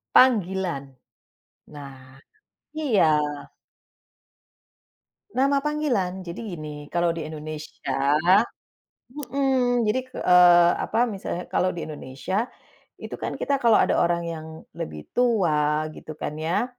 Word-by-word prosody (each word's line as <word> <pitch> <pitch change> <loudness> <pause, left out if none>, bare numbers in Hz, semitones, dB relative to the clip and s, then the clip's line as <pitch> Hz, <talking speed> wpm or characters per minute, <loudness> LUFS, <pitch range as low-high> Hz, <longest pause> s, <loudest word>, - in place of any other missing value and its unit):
panggilan, 190 - +3 0.9
nah 135 -2 -12 0.6
iya. 275 - +2 2.3
Nama 275 0 +2
panggilan 240 -12 -1
jadi 170 +4 -6 0.2
gini 150 -1 -8
kalau 175 0 +2
di 165 - -5
Indonesia, 150 -2 -2 1.1
mhm, 255 -3 +2
jadi, 255 +5 +1
eee, 175 -1 +6
apa 235 +2 +1
misalnya 190 -3 -5
kalau 185 - +1
di 170 - -5
Indonesia 155 - -3 0.5
itu, - - -9
kan - - -4
kita 280 -1 0
kalo 230 -2 +5
ada - - +3
orang 170 0 +1
yang 160 -1 -6 0.3
lebih 75 -1 -6
tua 155 -11 +2
gitu 155 - -10
kan 150 - -4
ya. 170 +8 0
175 Hz, 105 wpm, -24 LUFS, 155-235 Hz, 2.3 s, eee